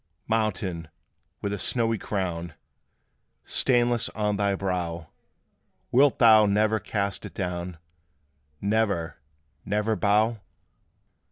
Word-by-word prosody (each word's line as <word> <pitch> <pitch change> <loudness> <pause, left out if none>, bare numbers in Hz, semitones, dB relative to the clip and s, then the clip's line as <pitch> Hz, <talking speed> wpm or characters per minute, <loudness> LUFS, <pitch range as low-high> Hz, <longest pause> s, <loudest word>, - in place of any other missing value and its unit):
Mountain, 100 -7 -1 0.6
with 100 0 -1
a 100 - -4
snowy 115 -3 0
crown 85 -6 -3 0.9
Stainless 120 -2 +2
on 105 -1 0
thy 100 -1 +1
brow, 90 -4 -3 0.8
Wilt 140 +2 +4
thou 110 -3 +7
never 105 +2 +2
cast 100 -1 -3
it - - -9
down 90 -2 -4 0.8
Never, 100 -6 0 0.4
never 105 +2 0
bow? 110 +2 +2
105 Hz, 95 wpm, -26 LUFS, 90-110 Hz, 0.9 s, thou